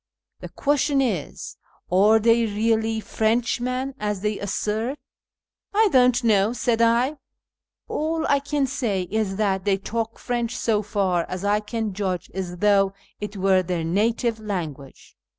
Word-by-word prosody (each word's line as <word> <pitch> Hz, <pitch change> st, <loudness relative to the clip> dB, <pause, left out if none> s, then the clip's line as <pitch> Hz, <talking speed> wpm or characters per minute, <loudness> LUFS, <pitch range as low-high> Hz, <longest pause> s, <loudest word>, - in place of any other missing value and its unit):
The -, -, -8 dB
([uestion 285 Hz, 0 st, +1 dB
is, 215 Hz, -, -2 dB, 0.3 s
are 205 Hz, +4 st, +5 dB
they 230 Hz, +1 st, +3 dB
really 220 Hz, +1 st, 0 dB
Frenchman, 245 Hz, +4 st, -1 dB
as 210 Hz, -2 st, -2 dB
they 210 Hz, 0 st, -1 dB
assert? 215 Hz, +6 st, -2 dB, 0.3 s
" -, -, -69 dB
" -, -, -54 dB
I 435 Hz, 0 st, +5 dB
don't 250 Hz, -1 st, +4 dB
know," 215 Hz, -1 st, +3 dB
said 235 Hz, -2 st, 0 dB
I; 240 Hz, +6 st, +3 dB, 0.3 s
" -, -, -67 dB
all 320 Hz, +1 st, -1 dB
I 280 Hz, -, +3 dB
can 285 Hz, 0 st, -1 dB
say 235 Hz, -8 st, -1 dB
is 215 Hz, -3 st, 0 dB
that 195 Hz, -2 st, 0 dB
they 200 Hz, -1 st, +2 dB
talk 225 Hz, +3 st, -3 dB
1 -, -, -23 dB
French, 240 Hz, -1 st, -2 dB
so 215 Hz, -2 st, +1 dB
far 195 Hz, -4 st, 0 dB
as 185 Hz, +2 st, -4 dB
I 205 Hz, +1 st, +3 dB
can 215 Hz, -1 st, -3 dB
judge, 185 Hz, -3 st, -3 dB
as 180 Hz, -1 st, -4 dB
though 195 Hz, 0 st, +3 dB, 0.3 s
it 210 Hz, 0 st, -6 dB
were 190 Hz, 0 st, +3 dB
their 175 Hz, -2 st, -2 dB
native 220 Hz, +6 st, 0 dB
langua^^e." 160 Hz, -10 st, -6 dB
215 Hz, 160 wpm, -23 LUFS, 195-240 Hz, 0.3 s, are